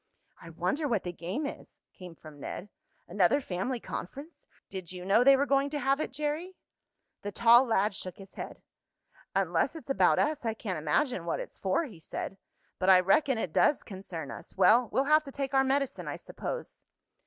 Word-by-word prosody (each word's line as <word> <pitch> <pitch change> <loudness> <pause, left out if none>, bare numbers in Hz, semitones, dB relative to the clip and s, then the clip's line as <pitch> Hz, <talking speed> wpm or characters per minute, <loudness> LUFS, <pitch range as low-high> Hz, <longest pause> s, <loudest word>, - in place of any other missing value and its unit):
"I 170 - -10
wonder 180 - -1
what 230 -7 0
the 175 - -3
game 185 - -4
is," 280 - -8
came 180 -3 -11
from 155 -2 -13
Ned. 195 +7 -6 0.4
"Another 185 +8 +3
family 240 +2 -3
conference! 280 - -8 0.2
Did 185 -3 -7
you 180 -1 -7
know 205 +5 +4
they 275 +1 +7
were 280 - +2
going 275 0 +2
to 295 0 -3
have 275 +1 +1
it, 310 - -2
Jerry?" 300 +6 -3 0.7
The 205 - -4
tall 235 +4 +6
lad 215 -3 +1
shook 185 -2 -6
his 195 -1 -13
head. - - -8 0.7
"Unless - - +1
it's 310 -4 -6
about - - +4
us 300 -2 +1
I 225 -2 -1
can't 190 -7 -4
imagine 170 - 0
what 170 - -1
it's - - -8
for," 190 - +1
he 220 - -9
said. 195 +4 -6 0.4
"But 185 - +2
I 185 -1 +8
reckon 235 - +3
it 180 -7 -3
does 295 - +3
concern 185 -6 -7
us. - - -10
Well, 235 +1 +5
we'll 265 - +2
have 305 +1 +5
to 275 - -8
take 275 0 -4
our 270 0 +5
medicine, 275 0 -1
I - - -3
suppose." - - -7
230 Hz, 195 wpm, -30 LUFS, 185-275 Hz, 0.7 s, I